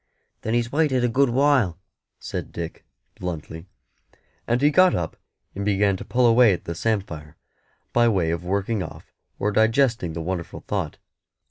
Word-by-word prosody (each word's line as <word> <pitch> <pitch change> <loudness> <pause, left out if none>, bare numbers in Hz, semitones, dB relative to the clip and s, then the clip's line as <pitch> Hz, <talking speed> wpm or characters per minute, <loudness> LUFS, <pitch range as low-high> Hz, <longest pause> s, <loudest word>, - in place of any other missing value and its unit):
"Then 110 +2 -1
He's 120 0 0
waited 140 -4 +2
a - - +4
good 130 +3 +2
while," 130 - +3 0.4
said - - -5
Dick, 85 -1 -6 0.4
bluntly; 80 -1 -6 0.8
and 120 +1 +2
he 145 +2 +4
got 185 +3 +5
up 85 -2 -3 0.4
and 100 - -4
began 100 -1 +2
to - - -7
pull 125 0 +1
away 115 -2 +6
at 85 - -5
the 85 - -3
samphire, 85 -7 -3 0.6
by 120 0 +4
way 95 -7 +1
of 85 +1 -3
working 100 +3 -1
off 80 - -9 0.2
or 105 - 0
digesting 110 - +2
the 85 - -4
wonderful 90 0 -4
thought. - - -2
105 Hz, 160 wpm, -24 LUFS, 85-120 Hz, 0.8 s, away